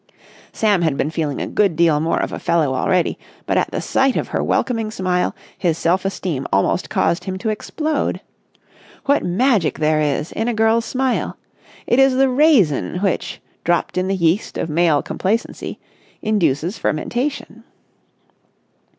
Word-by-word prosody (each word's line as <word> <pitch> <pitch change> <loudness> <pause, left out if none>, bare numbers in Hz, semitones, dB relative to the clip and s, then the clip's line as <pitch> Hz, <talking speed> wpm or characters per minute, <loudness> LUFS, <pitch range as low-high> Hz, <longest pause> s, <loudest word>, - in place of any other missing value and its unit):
Sam 205 -4 +2
had 155 -5 +1
been 150 - -1
feeling 155 -4 -2
a - - -2
good 200 -6 +1
deal 165 -1 +4
of 160 +3 0
a - - -5
fellow 155 -5 +1
already, 180 +6 +1 0.3
but - - 0
at - - +1
the - - -3
sight 270 -1 +1
of - - -2
her - - -1
welcoming 225 -4 0
smile 185 -4 -1 0.2
his 170 -3 0
self 185 +4 +1
esteem 180 -8 -3
almost 95 - +1
caused 170 - 0
him 190 -1 -3
to 220 +4 -2
explode. 305 +8 -2 0.9
What 285 +1 +2
magic 195 - +1
there 155 0 +2
is 150 +1 -1
in 225 - -2
a 240 - 0
girl's 225 +1 +2
smile! 260 -1 -1 0.5
It 240 - +2
is 270 -1 +5
the 270 0 +4
raisin 250 - +3
which, 195 - -1 0.2
dropped 175 0 0
in 185 0 0
the 195 - 0
yeast 170 +3 0
of 160 - -3
male 160 -2 +3
complacency, 220 +5 -2 0.5
induces 180 -3 0
fermentation. 250 - -3
185 Hz, 155 wpm, -20 LUFS, 160-230 Hz, 0.9 s, is